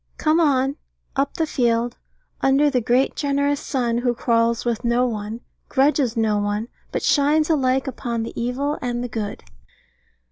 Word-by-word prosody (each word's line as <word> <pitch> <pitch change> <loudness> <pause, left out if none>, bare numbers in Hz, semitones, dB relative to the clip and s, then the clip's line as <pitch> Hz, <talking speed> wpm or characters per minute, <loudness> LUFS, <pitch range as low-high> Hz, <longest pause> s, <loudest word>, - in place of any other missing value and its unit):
Come 310 +1 +2
on, 275 -3 +2 0.4
up 275 0 0
the 325 - +1
field, 240 -4 0 0.5
under 280 +2 +4
the 250 -3 +1
great 245 +4 +2
generous 285 0 0
sun, 240 -6 -1
who 245 0 0
quarrels 230 0 +1
with 235 0 -1
no 240 +1 +2
one, 220 -1 -4 0.3
grudges 270 -3 +2
no 215 -2 +2
one, 205 +3 -2 0.2
but - - -2
shines 300 +2 +3
alike 265 -3 +2
upon 235 -3 -3
the 230 - -6
evil 260 +5 -2
and 245 -1 -2
the - - -2
good. 220 -3 -5
250 Hz, 155 wpm, -22 LUFS, 235-280 Hz, 0.5 s, under